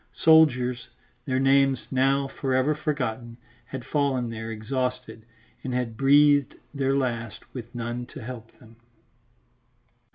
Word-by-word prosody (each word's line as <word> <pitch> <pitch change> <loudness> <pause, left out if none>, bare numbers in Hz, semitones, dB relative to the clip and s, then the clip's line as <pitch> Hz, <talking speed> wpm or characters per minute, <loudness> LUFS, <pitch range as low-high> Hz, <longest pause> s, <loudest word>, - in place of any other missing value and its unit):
Soldiers, 125 -6 +4 0.4
their 130 -1 0
names 135 -1 +3
now 135 +1 +2
for 135 -1 -2
ever 130 +4 +2
forgotten, 125 -6 -3 0.3
had 130 -2 -7
fallen 130 -4 0
there 115 0 -6
exhausted 125 0 -4 0.4
and 125 -1 -3
had 120 -3 -2
breathed 145 +2 +4 0.2
their 135 -1 0
last 115 -4 -3
with 120 -2 -9
none 120 +1 -4
to 130 - -10
help 115 -1 -8
them. 115 -1 -18
130 Hz, 125 wpm, -25 LUFS, 120-135 Hz, 0.4 s, Soldiers